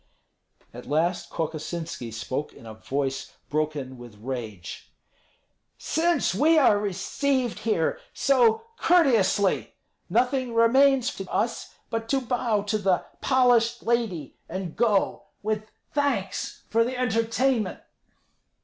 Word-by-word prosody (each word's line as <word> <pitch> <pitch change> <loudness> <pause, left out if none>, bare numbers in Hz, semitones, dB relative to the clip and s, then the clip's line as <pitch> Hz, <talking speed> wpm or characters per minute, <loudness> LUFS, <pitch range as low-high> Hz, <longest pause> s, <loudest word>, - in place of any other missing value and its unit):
At - - -10
last 165 +5 0
Kokosinski 160 -4 -4
spoke 130 +6 -4
in - - -15
a 110 - -8
voice 135 +4 -3 0.2
broken 145 -4 -2
with 120 -3 -11
rage: 105 - -6 0.9
"Since 340 - +1
we 315 - +4
are 235 -9 +5
received 240 +6 -1
here 210 -8 0
so 250 - +3
courteously, 235 - +3 0.3
nothing 255 -1 +1
remains 260 +3 +4
to 195 -1 -6
us 230 +1 -2 0.2
but 225 0 -3
to 275 - +2
bow 240 -4 0
to 210 +1 -1
the 190 -3 +1 0.2
polished 245 -3 +3
lady 225 - -1
and 185 -2 -5
go 215 -4 +1 0.2
with 215 0 -2 0.2
thanks 265 -10 -1
for 230 +1 +3
the 250 +2 -3
entertainment." 230 -1 0
215 Hz, 115 wpm, -26 LUFS, 160-250 Hz, 0.9 s, are